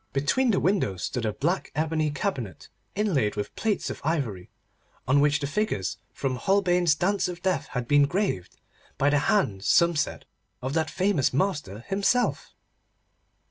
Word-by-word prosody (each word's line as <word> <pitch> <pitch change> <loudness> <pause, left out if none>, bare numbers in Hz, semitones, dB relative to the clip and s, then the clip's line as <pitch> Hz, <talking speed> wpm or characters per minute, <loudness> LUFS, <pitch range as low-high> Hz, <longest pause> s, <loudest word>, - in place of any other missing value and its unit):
Between 145 - +2
the 200 - +3
windows 175 - 0
stood 115 -3 -2
a 105 - -1
black 170 - -1
ebony 155 0 0
cabinet, 130 -7 -4 0.3
inlaid 170 - +1
with 105 - -4
plates 215 -3 -1
of - - -8
ivory, 135 - -2 0.6
on 140 +3 +4
which 145 +1 +3
the 145 - -2
figures 145 - -1
from 130 -2 -2
Holbein's 180 +1 +2
Dance 195 +5 +1
of 180 -1 -7
Death 185 -6 0
had 125 -3 -4
been 145 +1 +5
graved—by 145 - -3
the 145 - +3
hand, 125 - +1
some 170 +8 +4
said, 145 - -2 0.3
of 130 +2 -4
that 160 0 0
famous 185 -7 +1
master 145 - -1
himself. 205 +6 0
150 Hz, 150 wpm, -26 LUFS, 130-190 Hz, 0.6 s, been